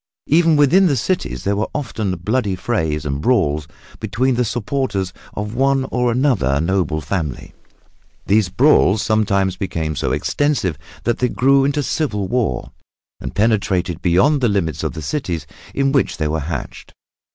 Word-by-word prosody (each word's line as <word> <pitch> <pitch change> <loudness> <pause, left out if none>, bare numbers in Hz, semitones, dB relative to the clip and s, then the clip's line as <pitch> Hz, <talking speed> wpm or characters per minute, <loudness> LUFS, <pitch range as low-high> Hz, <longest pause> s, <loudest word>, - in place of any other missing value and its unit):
Even 165 +1 +4
within 155 +7 +5
the 145 - +2
cities 110 - -2
there 100 +1 0
were 105 +2 -1
often 110 -9 -2
bloody 105 +3 -1
frays 80 -7 -2
and 70 0 -2
brawls 75 - +1 0.3
between 130 +3 0
the 125 +1 +1
supporters 105 -4 -2 0.2
of 105 +1 -4
one 135 +2 +2
or 125 -1 +1
another 115 - +1
noble 85 -2 0
family. 75 -4 -4 0.7
These 105 -2 +2
brawls 110 -2 +4
sometimes 100 -4 +1
became 80 -6 -3
so - - -1
extensive 140 - 0 0.3
that 120 - 0
they 125 - +1
grew 135 +2 +3
into 145 +1 0
civil 105 -11 -1
war, 115 - -1 0.5
and - - -7
penetrated 95 -5 +1
beyond 95 - +3
the 120 - +3
limits 90 -7 -1
of - - -2
the 80 -2 -7
cities 90 - -3 0.3
in 135 0 +2
which 135 -1 +1
they 80 - -1
were 80 +1 -1
hatched. 75 -2 -6
105 Hz, 155 wpm, -19 LUFS, 85-130 Hz, 0.7 s, within